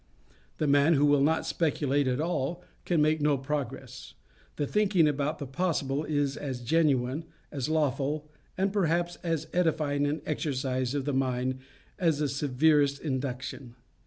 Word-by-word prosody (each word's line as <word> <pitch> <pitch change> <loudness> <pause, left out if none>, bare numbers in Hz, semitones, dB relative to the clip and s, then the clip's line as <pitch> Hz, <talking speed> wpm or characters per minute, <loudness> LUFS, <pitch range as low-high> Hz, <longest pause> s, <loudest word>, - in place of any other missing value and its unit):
The 155 - 0
man 145 +3 +4
who 145 +1 +4
will 145 -1 +4
not 160 +3 +2
speculate 145 -4 0
at 125 +1 0
all, 165 +1 -2 0.2
can 165 -4 +2
make 155 0 +2
no 145 -1 +3
progress. 135 -2 -5 0.4
The 145 - -1
thinking 195 -2 +3
about 150 +1 -1
the 145 - -5
possible 145 -1 -1
is 145 -2 0
as 130 -4 -5
genuine, 140 0 +1 0.3
as 135 -1 -3
lawful, 150 -1 0 0.3
and 195 +1 0
perhaps 175 -3 +1
as 165 -3 -2
edifying 155 -5 +1
an 150 +2 -2
exercise 130 -4 -1
of 140 -2 -1
the 145 - -1
mind 130 0 0 0.4
as 165 -5 +2
the 150 -1 0
severest 140 +1 +2
induction. 130 -3 -4
145 Hz, 150 wpm, -28 LUFS, 135-160 Hz, 0.4 s, man